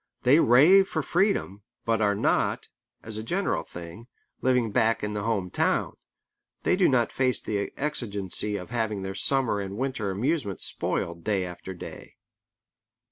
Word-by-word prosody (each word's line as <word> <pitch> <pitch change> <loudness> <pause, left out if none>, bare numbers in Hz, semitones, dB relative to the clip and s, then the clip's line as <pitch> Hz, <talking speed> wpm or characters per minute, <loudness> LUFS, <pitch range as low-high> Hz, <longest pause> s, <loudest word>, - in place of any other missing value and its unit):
They 135 +6 +6
rave 165 +11 +6
for 155 - -1
freedom, 175 - 0 0.2
but 115 -1 +1
are 105 -1 +2
not, - - 0 0.3
as 110 -1 -6
a - - -5
general 185 - 0
thing, 85 +7 -10 0.3
living 125 -4 +2
back 115 +2 +2
in 105 0 -2
the 105 - -2
home 100 -5 -1
town. - - 0 0.7
They - - +3
do 185 -1 +4
not 120 -4 +2
face 130 -1 +1
the 100 -2 -3
exigency 105 -8 -2
of 90 +1 -6
having 110 -4 -1
their 95 0 -4
summer 130 -1 +1
and 100 +1 -6
winter 130 -5 -2
amusement 105 - -1
spoiled 85 -1 -3
day 100 -3 0
after 90 +1 -8
day. - - -10
110 Hz, 155 wpm, -26 LUFS, 100-130 Hz, 0.7 s, They